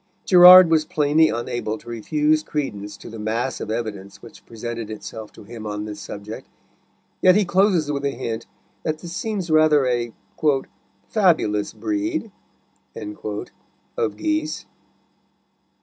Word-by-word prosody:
Gerard 180 -1 +9
was 160 -1 +4
plainly 155 -1 +2
unable 115 -1 -3
to 120 - -19
refuse 150 +7 +1
credence 105 -10 -4
to - - -12
the 115 - -9
mass 115 +5 -2
of - - -5
evidence 110 -4 -5
which 115 - -15
presented 115 -1 -6
itself 110 0 -8
to - - -13
him 110 0 -9
on 105 0 -4
this 105 -1 -7
subject, 105 +2 -8 0.7
yet 185 -1 +6
he 210 -1 +3
closes 180 -4 +2
with 140 -1 -3
a 140 - +1
hint 115 -3 -5 0.3
that 155 -1 -2
this 170 +1 -8
seems 200 -7 -3
rather 155 -3 +4
a 120 -2 -1 1.0
"fabulous 160 - +2
breed" 315 -7 -3 0.6
of 105 - -6
geese. 310 -1 -2
135 Hz, 135 wpm, -22 LUFS, 110-175 Hz, 1.0 s, Gerard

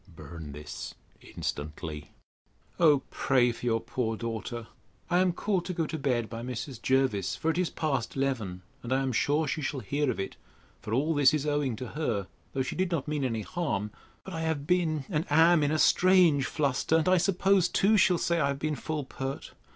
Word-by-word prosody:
Burn 80 -3 -10
this 75 +1 -7 0.3
instantly.' 75 0 -5 0.7
O 150 -5 +5
pray 125 -3 +2
for 115 - -11
your 115 -1 +2
poor 115 -2 -2
daughter. 115 0 -4 0.5
I 175 - +4
am 185 -1 +3
called 185 0 -1
to 180 - -4
go 165 - 0
to 160 0 -4
bed 125 -5 0
by 115 0 -6
Mrs. 120 0 -5
Jervis, 130 -8 +1
for 165 - 0
it 160 - -4
is 180 - +1
past 155 -4 -2
eleven; 115 -10 -2 0.2
and 120 - -7
I 135 +1 +2
am 130 - -1
sure 145 +7 +1
she 155 - -2
shall 135 -1 -3
hear 140 +6 -1
of 120 - -2
it; 95 - -4 0.4
for 105 - -7
all 145 +8 +1
this 145 -1 +5
is 150 -1 -2
owing 145 -5 0
to 125 0 -6
her, 115 -11 -2 0.3
though 135 - 0
she 125 - -4
did 185 0 0
not 165 -6 -2
mean 150 -2 -1
any 115 -4 -1
harm. 120 - -2 0.3
But 190 - -8
I 165 - -3
have 160 -3 -1
been, 160 -4 +1
and 155 -4 -1
am, 165 +2 +6
in 145 - +2
a 155 - +1
strange 175 -5 +5
fluster; 145 +1 0
and 160 0 +2
I 185 0 +5
suppose 190 0 +3
too, 210 +3 +3
she'll 180 -3 +4
say, 170 0 +1
I 140 - +2
have 140 -1 -1
been 155 +2 -1
full 150 0 -3
pert. 135 +1 -6
140 Hz, 205 wpm, -29 LUFS, 120-160 Hz, 0.7 s, am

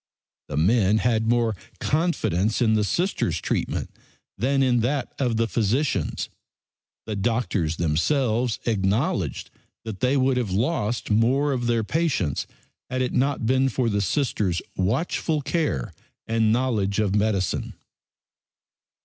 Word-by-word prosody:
The 75 - -4
men 100 +4 +3
had 110 -1 +1
more 115 -2 +2 0.2
confidence 115 - 0
in 110 -3 +3
the 105 -1 +2
Sisters' 105 - 0
treatment - - -2 0.4
than 135 +6 +1
in 125 -2 +3
that 130 +3 -1
of 120 -4 +1
the 115 0 +2
physicians'. 110 - 0 0.8
The 110 - -3
doctors 100 -6 0
themselves 110 - +1
acknowledged 100 - 0 0.3
that 110 -4 -6
they 130 +2 +2
would 130 -1 +2
have 120 -5 -1
lost 110 - -1
more 130 +7 +3
of 120 -2 -2
their 115 -1 +2
patients 135 - 0 0.4
had 130 0 0
it 125 - -2
not 135 -2 +1
been 130 +3 +3
for 125 -1 0
the 100 -1 0
Sisters' 100 - 0
watchful 145 - 0
care 135 - -1 0.3
and 115 -1 +2
knowledge 110 -5 +1
of 105 -3 +1
medicine. 100 -3 0
115 Hz, 130 wpm, -24 LUFS, 100-130 Hz, 0.8 s, men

